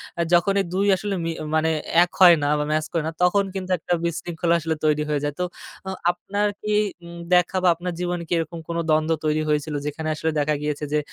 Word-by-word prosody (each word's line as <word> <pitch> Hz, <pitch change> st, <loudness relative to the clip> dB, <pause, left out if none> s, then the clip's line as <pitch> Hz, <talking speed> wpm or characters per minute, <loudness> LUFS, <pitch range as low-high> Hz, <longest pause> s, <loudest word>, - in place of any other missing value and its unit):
অ্যা 170 Hz, -, 0 dB
যখন 175 Hz, +3 st, +4 dB
এই 195 Hz, -, -3 dB
২ 195 Hz, +2 st, +1 dB
আসলে 200 Hz, +1 st, -3 dB
মি 165 Hz, -, -1 dB, 0.2 s
মানে 160 Hz, +1 st, +2 dB, 0.2 s
অ্যা 170 Hz, +1 st, +7 dB
এক 175 Hz, -, -4 dB
হয় 175 Hz, -2 st, +9 dB
না -, -, +1 dB
বা -, -, +1 dB
ম্যাচ 155 Hz, 0 st, +1 dB
করে 165 Hz, -2 st, 0 dB
না, -, -, -2 dB
তখন 200 Hz, +3 st, +4 dB
কিন্তু 185 Hz, -1 st, -4 dB
একটা 175 Hz, +2 st, -2 dB
বিশৃঙ্খলা 170 Hz, 0 st, -1 dB
আসলে 160 Hz, 0 st, -2 dB
তৈরি 150 Hz, 0 st, +2 dB
হয়ে 150 Hz, -, +1 dB
যায়। 145 Hz, -, -1 dB
তো -, -, +1 dB, 0.4 s
অ -, -, -2 dB, 0.2 s
আপনার 200 Hz, +4 st, -2 dB
কি 210 Hz, 0 st, -1 dB, 0.3 s
উম 170 Hz, 0 st, -10 dB, 0.2 s
দেখা 180 Hz, +1 st, +3 dB
বা 185 Hz, -, +4 dB
আপনার 175 Hz, +1 st, -4 dB
জীবনে 175 Hz, -1 st, -2 dB
কি -, -, -2 dB
এরকম 165 Hz, +1 st, -3 dB
কোনো 170 Hz, 0 st, -2 dB
দ্বন্দ্ব 155 Hz, +1 st, +2 dB
তৈরি 155 Hz, 0 st, +1 dB
হয়েছিল, 150 Hz, 0 st, 0 dB
যেখানে 155 Hz, +2 st, -4 dB
আসলে 160 Hz, +1 st, -1 dB
দেখা 150 Hz, +1 st, +1 dB
গিয়েছে 150 Hz, 0 st, -3 dB
যে 150 Hz, -, +3 dB
170 Hz, 230 wpm, -23 LUFS, 155-180 Hz, 0.4 s, হয়